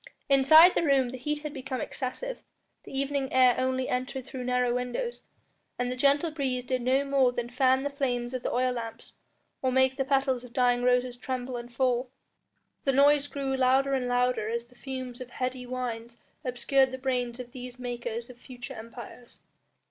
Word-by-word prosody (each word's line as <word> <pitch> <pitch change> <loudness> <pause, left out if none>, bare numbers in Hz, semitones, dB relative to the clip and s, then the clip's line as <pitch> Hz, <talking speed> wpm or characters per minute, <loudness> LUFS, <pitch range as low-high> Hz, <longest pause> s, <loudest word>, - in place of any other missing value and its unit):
Inside 310 +6 +8
the - - +1
room 275 -5 +3
the 260 - -6
heat 295 +3 -3
had 300 -1 -5
become 260 -2 -4
excessive, 305 - -4 0.4
the - - -11
evening 275 -1 -1
air 255 -1 +6
only 260 0 0
entered 255 +1 -3
through 260 -2 -6
narrow 250 -1 +1
windows, 250 - -3 0.6
and 245 0 -1
the - - -2
gentle 285 +5 +2
breeze 260 -5 -2
did 255 0 -1
no 260 +3 +2
more 275 -2 +3
than 240 -1 -4
fan 260 +1 +3
the 285 - -1
flames 250 -3 -2
of 255 - -3
the - - -2
oil 255 +1 +1
lamps 230 -2 -6 0.5
or 260 - +1
make 260 0 +3
the 270 - +1
petals 270 -2 +1
of 245 -1 -12
dying 245 -1 +3
roses 250 0 +2
tremble 255 0 -4
and 240 0 -7
fall. 250 0 +1 0.7
The 270 - +2
noise 285 +1 +5
grew 275 -2 -2
louder 265 +1 +3
and 255 -2 0
louder 245 -3 +1
as 235 +1 -2
the 250 +1 -23
fumes 255 -1 -6
of 255 - -7
heady 255 0 -4
wines 235 -2 -5 0.3
obscured 260 +1 +2
the 260 - -4
brains 250 -2 -2
of 245 -1 -8
these 250 -1 -8
makers 240 -2 -4
of 250 -1 -14
future 250 +1 -9
empires. 235 +1 -11
255 Hz, 185 wpm, -28 LUFS, 245-270 Hz, 0.7 s, Inside